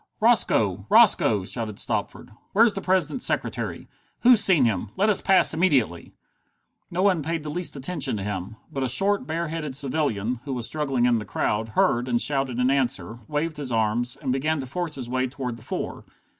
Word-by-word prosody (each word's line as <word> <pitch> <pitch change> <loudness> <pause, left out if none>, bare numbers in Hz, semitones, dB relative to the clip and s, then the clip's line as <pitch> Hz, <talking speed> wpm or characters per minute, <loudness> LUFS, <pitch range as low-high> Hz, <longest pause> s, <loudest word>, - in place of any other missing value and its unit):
"Roscoe! - - +3
Roscoe!" 100 -3 +5
shouted 110 -1 -4
Stopford. - - -3 0.2
"Where's 225 +1 +5
the 195 - -4
President's 185 - 0
secretary? - - -1 0.3
Who's 240 -4 +6
seen 165 -10 +5
him? 110 -2 -1
Let 205 +3 +2
us 210 - +2
pass 190 -3 +4
immediately!" 140 - 0 0.7
No 180 +2 -1
one 190 -5 +2
paid 165 +1 -3
the 150 - -5
least 175 +1 -2
attention 135 -3 -2
to 100 - -5
him. 95 +1 -5 0.2
But 135 - -3
a 130 - 0
short, 195 - +2
bare 165 +1 -3
headed 155 -4 -5
civilian, 125 -5 -1
who 140 -2 -5
was 120 -2 -2
struggling 135 -5 -1
in 120 -2 +2
the - - -6
crowd, 105 +2 -2
heard, 120 +1 +2
and 120 -1 +1
shouted 135 -3 0
in 125 +1 +2
answer, 120 -6 -2
waved 155 +1 -2
his 140 -4 -5
arms, 115 +2 0
and 130 - -1
began 150 +4 -1
to - - -6
force 165 +4 -4
his 130 -3 -6
way 130 +1 -1
toward 125 -2 -5
the 115 - -15
four. - - -5
135 Hz, 190 wpm, -24 LUFS, 120-165 Hz, 0.7 s, Who's